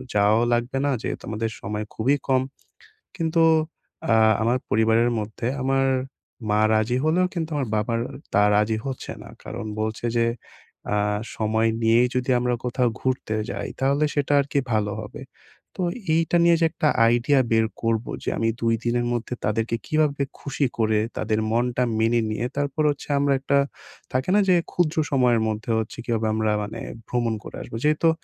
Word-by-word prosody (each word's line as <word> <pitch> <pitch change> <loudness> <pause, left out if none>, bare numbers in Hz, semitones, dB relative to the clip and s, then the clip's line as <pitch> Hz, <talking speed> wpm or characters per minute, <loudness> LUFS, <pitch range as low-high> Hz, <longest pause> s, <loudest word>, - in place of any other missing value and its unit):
যাওয়াও 105 +3 +4
লাগবে 120 +3 -1
না 145 - +2
যেহেতু - - -4
আমাদের 110 +1 -2
সময় 105 +1 -3
খুবই 130 +6 +2
কম 130 -1 +3 0.8
কিন্তু 165 -1 +2 0.7
আ - - +5 0.3
আমার 120 +3 +2
পরিবারের 110 +2 +3
মধ্যে, 110 +2 -4
আমার 135 +1 +2 0.7
মা 105 - +3
রাজি 110 +3 +2
হলেও 175 +4 +3
কিন্তু 165 -2 -3
আমার 140 -4 -1
বাবার 115 +2 0 0.3
তা 100 - +5
রাজি 105 +1 +2
হচ্ছে 135 -2 -5
না, - - -12
কারণ - - -6 0.2
বলছে 110 +2 -3
যে 115 - +3 0.7
আ - - +2 0.4
"সময় 110 +1 +1
নিয়েই 115 +2 +4
যদি 125 +1 -1
আমরা 125 0 0
কোথাও 125 0 +1
ঘুরতে 130 -4 -1 0.2
যাই - - -4
তাহলে 140 +3 +2
সেটা 145 0 +1
আরকি 140 0 -1
ভালো 105 -1 +1
হবে।" 105 - -9 0.6
তো - - +1 0.3
এইটা 165 +1 +2
নিয়ে 170 0 +6
যে - - +5
একটা 155 -1 0 0.2
আইডিয়া 120 +4 +3
বের 110 0 +4 0.2
করবো, 115 0 0
যে - - -1
আমি 115 0 +1
২ 115 0 +2
দিনের 120 0 +1
মধ্যে 120 +1 -3
তাদেরকে 115 +2 0
কীভাবে 150 -2 +1 0.2
খুশি 140 0 -1
করে? 110 -2 +2 0.2
তাদের 110 0 0
মনটা 120 +2 +1 0.2
মেনে 115 +1 +3
নিয়ে, 120 +3 -2
তারপর 145 +1 0
হচ্ছে 145 - -8
আমরা 140 0 +2
একটা 140 +1 +1 0.6
থাকে 130 +5 0
না? - - +5
যে, 180 - +6 0.2
ক্ষুদ্র 170 -2 0
সময়ের 125 -4 +3
মধ্যে 110 +1 -3
হচ্ছে 110 - -5
কীভাবে 115 -2 0
আমরা 110 -1 +1
মানে 105 - -6 0.3
ভ্রমণ 120 -2 0
করে - - -9
আসবো? - - -8
যেহেতু 155 +2 +3
120 Hz, 170 wpm, -24 LUFS, 110-140 Hz, 0.8 s, নিয়ে